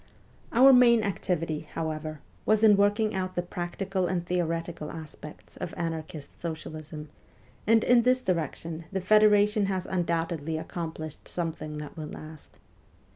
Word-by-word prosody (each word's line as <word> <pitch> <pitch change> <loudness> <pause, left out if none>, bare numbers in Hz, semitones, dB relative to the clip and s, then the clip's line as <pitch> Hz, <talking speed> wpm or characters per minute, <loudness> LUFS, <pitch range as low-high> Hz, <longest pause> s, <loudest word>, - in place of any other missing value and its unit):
Our 265 +3 +7
main 235 -3 +6
activity, 165 -5 -1 0.2
however, 155 -1 -4 0.2
was 215 0 +2
in 210 -2 +8
working 205 +2 +2
out 185 -1 -3
the 175 - 0
practical 180 +2 -2
and 175 -2 -1
theoretical 165 -3 -2
aspects 155 -1 -10
of 175 - -5
anarchist 160 -3 -5
socialism, 155 -2 -6 0.6
and 225 0 +5
in 245 -1 +5
this 255 +1 +2
direction 165 - -2
the 195 - -1
federation 210 +1 +4
has 190 -2 -2
undoubtedly 165 -3 -1
accomplished 160 -2 -6
something 160 -3 -4
that 150 -1 -7
will 155 -1 -5
last. 155 0 -11
175 Hz, 130 wpm, -28 LUFS, 160-200 Hz, 0.6 s, in